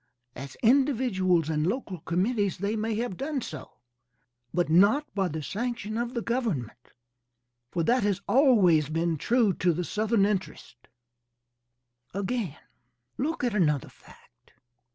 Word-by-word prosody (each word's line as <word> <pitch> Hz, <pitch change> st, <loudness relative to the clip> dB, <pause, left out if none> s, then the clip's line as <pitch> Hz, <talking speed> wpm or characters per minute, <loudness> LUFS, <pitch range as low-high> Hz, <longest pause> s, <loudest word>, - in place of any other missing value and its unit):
As 135 Hz, 0 st, -8 dB
individuals 225 Hz, -, +2 dB
and 155 Hz, 0 st, 0 dB
local 195 Hz, -4 st, -3 dB
committees 195 Hz, +4 st, 0 dB
they 200 Hz, +3 st, -2 dB
may 220 Hz, 0 st, -1 dB
have 225 Hz, -5 st, -3 dB
done 285 Hz, 0 st, -2 dB
so, 155 Hz, -, -8 dB, 0.8 s
but 175 Hz, -1 st, 0 dB
not 200 Hz, -, +4 dB
by 195 Hz, -2 st, 0 dB
the 160 Hz, -2 st, -5 dB
sanction 220 Hz, -, -4 dB
of 235 Hz, +1 st, -3 dB
government, 175 Hz, -, -3 dB, 0.8 s
for 170 Hz, -, -1 dB
that 245 Hz, +9 st, +2 dB
has 200 Hz, -2 st, 0 dB
always 195 Hz, -, +4 dB
been 165 Hz, +1 st, 0 dB
true 225 Hz, -, +2 dB
to 180 Hz, 0 st, +1 dB
the 175 Hz, +3 st, -2 dB
Southern 215 Hz, 0 st, +1 dB
interests. 190 Hz, -, -4 dB, 1.3 s
Again, 200 Hz, -, -2 dB, 0.6 s
look 315 Hz, +3 st, -2 dB
at 240 Hz, -3 st, 0 dB
another 150 Hz, -9 st, +1 dB
fact. -, -, -21 dB
200 Hz, 130 wpm, -27 LUFS, 170-240 Hz, 1.3 s, not